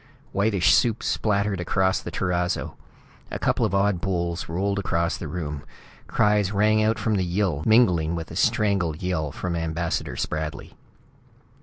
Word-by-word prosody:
Whitish 100 -2 +3
soup 115 -3 +2
splattered 100 -2 0
across 95 +2 +1
the - - -6
terrazzo. 90 0 -1 0.5
A - - -4
couple - - +1
of 100 - -2
odd 100 -2 +2
bowls 85 -3 -2
rolled 100 +4 -1
across 85 -3 0
the 80 - -6
room. 75 -3 -5 0.4
Cries 105 -3 +2
rang 110 +1 +3
out 110 +1 +2
from 110 -3 0
the 95 - +1
Yill, 90 -4 0
mingling 90 -8 +4
with 80 -1 -6
a - - -7
strangled 95 -6 +1
yell 80 -5 -1
from 90 +4 -4
Ambassador 80 0 -2
Spradley. 75 0 -4
90 Hz, 150 wpm, -24 LUFS, 85-100 Hz, 0.5 s, mingling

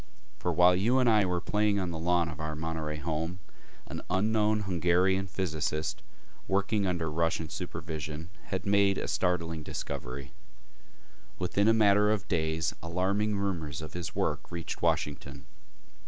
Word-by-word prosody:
For 90 - 0
while 90 +2 +6
you 115 +8 +3
and 130 -2 +4
I 105 -3 +5
were 90 -1 0
playing 105 +2 +1
on 90 -2 -1
the 80 - -4
lawn 85 0 +2
of 80 -2 -7
our 80 0 -3
Monterey 80 -1 -3
home, 80 +3 -2 0.5
an - - -6
unknown 105 +2 +2
Hungarian 95 +1 +2
physicist 80 -4 -2 0.5
working 100 +1 +1
under 85 -3 -1
Russian 80 0 0
supervision 80 +1 -5
had 95 - -3
made 100 -1 +4
a - - -2
startling 85 -3 0
discovery. 65 -2 -5 1.1
Within 100 +3 +1
a 115 - +6
matter 105 -1 +5
of 105 -2 0
days 80 -2 0
alarming 100 +5 0
rumors 85 -8 -2
of 80 0 -7
his 85 -2 -5
work - - -1
reached 85 -1 -5
Washington. 70 -1 -1
90 Hz, 145 wpm, -30 LUFS, 80-100 Hz, 1.1 s, while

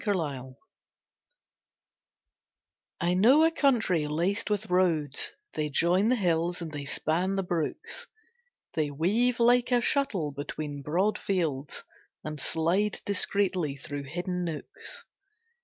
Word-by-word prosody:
Roads 145 - -2 2.4
I 175 0 +1
know 245 +12 +6
a 325 - +4
country 230 - +2
laced 180 +9 -1
with 210 0 0
roads, 165 -6 +1 0.2
They 150 -1 -1
join 175 +7 +3
the 255 - +4
hills 175 -4 0
and 165 -2 -6
they 145 -2 -5
span 175 +7 0
the 195 - 0
brooks, 445 - -3 0.7
They 155 -2 0
weave 215 - +1
like 245 +1 +4
a 245 - +5
shuttle 235 - +1
between 145 +1 -5
broad 180 +9 0
fields, 155 -8 -2 0.4
And 155 -1 -5
slide 175 +8 0
discreetly 185 -6 +1
through 140 0 -6
hidden 180 +4 -3
nooks. 165 -3 -6
175 Hz, 120 wpm, -28 LUFS, 150-210 Hz, 2.4 s, know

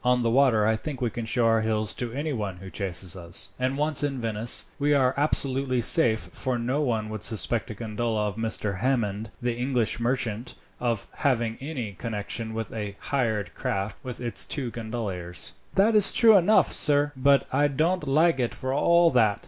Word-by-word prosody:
On 125 0 +2
the 115 - +1
water 120 -5 +3
I 110 +1 +2
think 135 +4 -6
we 120 -3 -1
can 120 -2 -5
show 120 +1 0
our 115 -1 +3
heels 110 -1 0
to 120 -2 -5
anyone 120 - -4
who 95 +1 -11
chases 95 -2 -2
us; 85 -2 -4
and 130 +2 -1
once 150 -1 +1
in 140 -3 -2
Venice, 115 0 +3
we 145 +1 +2
are 130 -2 +2
absolutely 135 -3 +3
safe, 120 -3 +3
for 130 -2 -3
no 125 +5 -1
one 115 -6 -1
would 110 -2 -6
suspect 110 +3 0
a 110 - -6
gondola 110 0 -2
of 105 -1 -3
Mr. 110 -3 -3
Hammond, 110 -4 -1
the 120 -1 -1
English 125 -2 0
merchant, 120 -1 -2 0.2
of 115 -4 -2
having 120 -6 0
any 130 -8 -5
connection 110 +1 -4
with 115 0 -5
a 105 -2 -5
hired 110 - -2
craft 100 +1 -3
with 125 -2 -6
its 120 -2 -2
two 130 -5 -1
gondoliers." 105 -6 -5 0.2
"That 205 +4 +3
is 210 -2 +6
true 225 -2 +6
enough, 200 +3 +4
sir; 145 0 +3
but 140 +1 +3
I 145 +2 +3
don't 155 +3 -1
like 155 +1 +3
it 120 -2 -1
for 130 0 -4
all 170 +4 +4
that. 110 -5 +2
120 Hz, 190 wpm, -25 LUFS, 110-135 Hz, 0.2 s, is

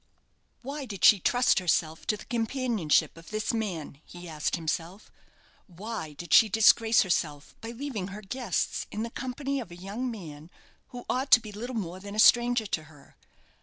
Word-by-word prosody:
"Why 280 +2 -5
did 200 -6 -1
she 205 - +8
trust 245 +5 +3
herself 160 -3 -1
to 210 - +1
the - - -12
companionship 230 - 0
of 165 - -13
this 215 +3 -2
man?" 175 -10 -4
he 175 0 -11
asked 155 -2 -2
himself. 170 +4 -4 0.6
"Why 190 -3 -7
did 170 +3 -5
she 225 - +7
disgrace 225 +2 +5
herself 155 -6 -2
by 225 - -6
leaving 235 -5 -5
her 205 +2 -9
guests 230 -2 -2
in 215 - -4
the 230 - -5
company 270 +2 -3
of 235 - -7
a 175 - -10
young 200 +8 -5
man 160 -8 -9 0.4
who 245 -1 -10
ought 265 +2 -1
to 245 - +10
be 215 -2 -10
little 240 +5 -6
more 185 -4 -4
than 200 +1 -8
a - - -6
stranger 240 +1 +5
to 160 -6 -3
her? 145 -2 -19
210 Hz, 180 wpm, -28 LUFS, 170-240 Hz, 0.6 s, to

